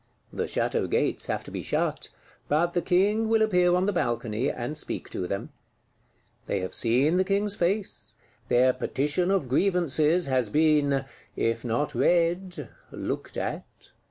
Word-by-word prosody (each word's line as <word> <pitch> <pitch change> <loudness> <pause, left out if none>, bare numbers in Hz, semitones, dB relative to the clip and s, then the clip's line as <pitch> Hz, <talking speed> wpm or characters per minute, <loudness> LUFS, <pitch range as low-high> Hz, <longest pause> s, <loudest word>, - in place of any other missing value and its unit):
The - - -2
Château - - -1
gates - - 0
have - - -2
to - - -11
be - - -4
shut; - - -2 0.4
but 170 +4 +1
the 175 - +1
King 205 +6 +2
will 225 -1 +4
appear 180 -4 +3
on 180 +1 +2
the 205 - 0
balcony, 120 -4 -1
and 125 +5 -4
speak 155 - -4
to 90 - -3
them. 100 +1 -4 1.0
They 100 - -1
have 95 - -5
seen 130 +9 +2
the 185 - +3
King's 200 +1 +1
face; 195 +2 -2 0.3
their 125 +1 +4
Petition 150 +9 -1
of 195 -8 +1
Grievances 170 +1 +2
has 130 -4 0
been, 145 -1 +2 0.3
if 115 0 -1
not 125 +5 -1
read, 175 +1 +1 0.2
looked - - -5
at. - - -3
160 Hz, 155 wpm, -26 LUFS, 130-185 Hz, 1.0 s, will